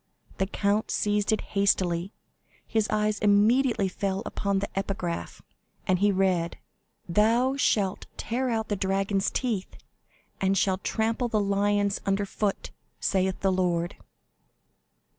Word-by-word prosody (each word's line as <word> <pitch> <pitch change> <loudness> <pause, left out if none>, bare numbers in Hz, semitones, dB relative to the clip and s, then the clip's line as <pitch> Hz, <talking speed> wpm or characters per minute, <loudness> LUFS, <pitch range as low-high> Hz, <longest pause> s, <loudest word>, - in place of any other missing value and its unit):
The 190 - +1
count 205 +2 0
seized 205 0 +1
it 220 - +1
hastily, 190 -2 +1 0.5
his 220 -1 0
eyes 210 -1 0
immediately 210 +2 +3
fell 195 +1 -2
upon 200 -1 -1
the 200 +1 -1
epigraph, 190 -3 -3 0.4
and 185 -2 +2
he 205 +1 +4
read: 185 -3 +1 0.5
"Thou 230 +8 +3
shalt 205 -8 0
tear 250 +3 -2
out 220 -2 -1
the 205 - +1
dragons' 195 +1 0
teeth, 225 -7 -3 0.6
and 195 0 +2
shall 190 0 +1
trample 225 +4 -1
the 220 -2 0
lions 205 0 +1
under 195 +1 0
foot, 200 0 -2 0.3
saith 190 -1 0
the 195 - +2
Lord." 175 -2 0
200 Hz, 125 wpm, -27 LUFS, 190-215 Hz, 0.6 s, he